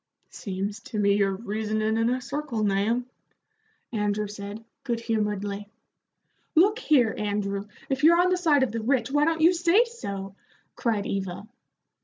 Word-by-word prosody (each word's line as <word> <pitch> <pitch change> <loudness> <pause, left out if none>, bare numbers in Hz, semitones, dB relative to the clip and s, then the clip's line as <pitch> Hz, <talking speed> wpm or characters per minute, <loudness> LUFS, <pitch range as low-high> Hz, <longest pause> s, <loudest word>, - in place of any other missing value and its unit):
"Seems 200 +1 -4
to 225 - -6
me 200 -1 +3
you're 200 -1 +2
reasonin' 215 0 -1
in 225 +1 +2
a 255 +1 0
circle, 265 -4 -3
Nahum," 210 +5 +1 0.9
Andrew 210 -1 0
said, 205 +2 -8 0.2
good 235 -3 -1
humoredly. 210 -3 -2 0.9
"Look 405 +7 +5
here, 255 - +3
Andrew, 205 -1 -2 0.2
if 270 0 -2
you're 340 +2 +7
on 365 +1 +4
the - - +4
side 305 -6 +3
of 260 - 0
the 230 0 -3
rich, 260 +3 +1
why 290 +1 +3
don't 325 0 0
you 335 +3 +6
say 350 +7 +4
so?" 200 - -6 0.4
cried 220 -5 -1
Eva. 190 -1 -3
220 Hz, 155 wpm, -26 LUFS, 205-280 Hz, 0.9 s, you're